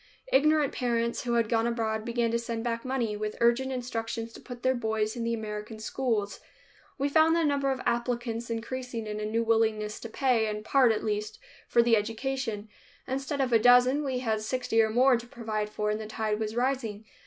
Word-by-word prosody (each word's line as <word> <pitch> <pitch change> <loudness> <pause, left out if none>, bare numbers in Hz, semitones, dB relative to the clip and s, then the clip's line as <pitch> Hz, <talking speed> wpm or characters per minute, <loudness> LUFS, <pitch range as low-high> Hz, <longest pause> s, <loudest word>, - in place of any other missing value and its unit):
Ignorant 300 +1 +4
parents 235 -1 -1
who 240 - 0
had 230 -2 +2
gone 230 0 +1
abroad 220 -2 -1
began 235 -1 0
to 235 - +1
send 230 -1 -4
back 230 -1 -2
money, 250 -5 -1
with 210 0 -4
urgent 240 +3 +3
instructions 230 -2 -4
to - - -11
put 245 -1 -10
their 260 - +3
boys 220 -2 -1
in 235 - -3
the 230 0 0
American 215 0 -6
schools. 220 -2 -2 0.6
We 280 - +1
found 315 +3 +4
the 335 - +2
number 280 -2 +1
of 265 - -2
applicants 235 -1 -1
increasing 235 0 -4
and 210 0 -4
a - - -2
new 225 +2 0
willingness 220 -2 +1
to 230 - -7
pay, 240 -2 +2
in 210 0 -4
part 255 0 +4
at 220 - -1
least, 210 0 -2 0.3
for 235 - +4
the 235 -1 +4
education. 225 0 -2 0.4
Instead 270 +2 -2
of 255 -2 0
a 225 - +6
dozen, 250 +5 +5
we 265 -3 -1
had 220 -4 -1
sixty 225 0 +1
or 220 - +2
more 250 +3 +4
to 235 +1 -9
provide 220 -4 -3
for 210 0 -1
and 210 - -2
the 215 - -6
tide 215 -1 -2
was 215 0 -3
rising. 240 -4 -1
230 Hz, 205 wpm, -28 LUFS, 220-255 Hz, 0.6 s, a